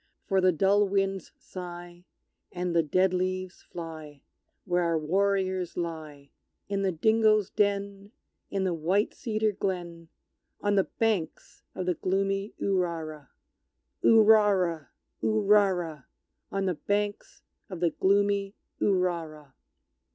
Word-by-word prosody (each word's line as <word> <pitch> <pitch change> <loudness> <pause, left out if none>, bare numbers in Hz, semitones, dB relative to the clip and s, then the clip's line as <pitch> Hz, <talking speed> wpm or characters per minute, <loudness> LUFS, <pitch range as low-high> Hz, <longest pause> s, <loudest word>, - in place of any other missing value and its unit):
For 195 -2 +2
the 185 0 +5
dull 200 +5 +3
winds 195 -2 -1
sigh, 175 -1 -9 0.5
And 180 -1 -3
the 165 - +5
dead 185 +4 +2
leaves 185 0 -2
fly, 155 -4 -9 0.4
Where 180 -2 +1
our 170 -1 +1
warriors 190 +2 0
lie, 155 -5 -6 0.4
In 200 -1 -1
the 195 -1 +1
dingoes' 215 +3 +3
den 200 -1 -1 0.4
in 195 -1 -1
the 185 -2 0
white 180 +6 0
cedar 220 -3 -1
glen 175 -4 -4 0.5
On 205 0 0
the 195 -2 +3
banks 210 -8 -2
of 185 - -3
the 180 - +1
gloomy 195 +3 -1
Urara! 165 -6 -2 0.7
Urara! 205 -7 +4 0.3
Urara! 195 -8 +2 0.5
On 195 0 -1
the 185 - +1
banks 205 +6 -3 0.3
of 185 -4 -6
the 170 -1 +2
gloomy 200 +2 +1 0.3
Urara! 170 -7 -1
185 Hz, 115 wpm, -28 LUFS, 170-200 Hz, 0.7 s, the